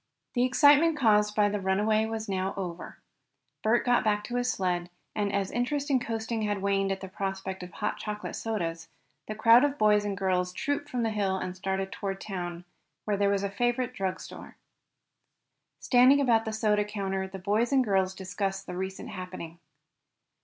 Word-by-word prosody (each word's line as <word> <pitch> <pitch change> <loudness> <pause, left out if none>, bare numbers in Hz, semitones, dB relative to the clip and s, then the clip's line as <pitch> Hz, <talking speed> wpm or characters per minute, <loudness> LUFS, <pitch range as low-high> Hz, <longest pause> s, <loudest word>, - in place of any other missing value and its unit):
The 245 -1 +2
excitement 290 +4 +5
caused 210 -5 +3
by 210 -1 +4
the 205 0 -2
runaway 210 +3 +2
was 220 -1 -4
over 195 - -2
now. 185 -2 -4 0.7
Bert 225 +2 +2
got 245 -1 +3
back 210 -1 +1
his 245 0 -1
sled 180 -2 -1 0.3
and, 205 -1 0
as 200 -1 -1
interest 280 +4 -1
in 260 - +4
coasting 225 -1 -3
had 205 -1 -1
waned 195 -1 +1
at 195 - -3
the 190 - -6
prospect 190 0 -4
of 180 - -7
hot 210 - -3
chocolate 210 0 -5
sodas, 170 -7 -3 0.4
the 215 - -4
crowd 230 +3 +6
of 290 0 +1
boys 210 -1 +4
and 200 -1 -3
girls 180 -1 0
trooped 285 +5 -2
from 245 -2 -1
the 225 - 0
hill 195 -3 0
and 185 -1 -4
started 190 +1 -2
toward 195 -1 -4
town, 175 -4 -5 0.4
where 210 - +1
there 200 0 +2
was 200 0 +1
a 200 - -1
favorite 240 +4 0
drug 190 -1 -2
store. - - -11 1.2
Standing 255 +3 +5
about 235 -5 +3
the 220 - -2
soda 215 -1 +2
counter 195 -2 -3
the 190 0 -8
boys 210 +6 0
and 270 -2 +4
girls 190 -3 +1
discussed 195 +1 -3
the 180 - -6
recent 190 +1 -5
happening. 180 -3 -7
205 Hz, 180 wpm, -28 LUFS, 190-225 Hz, 1.2 s, crowd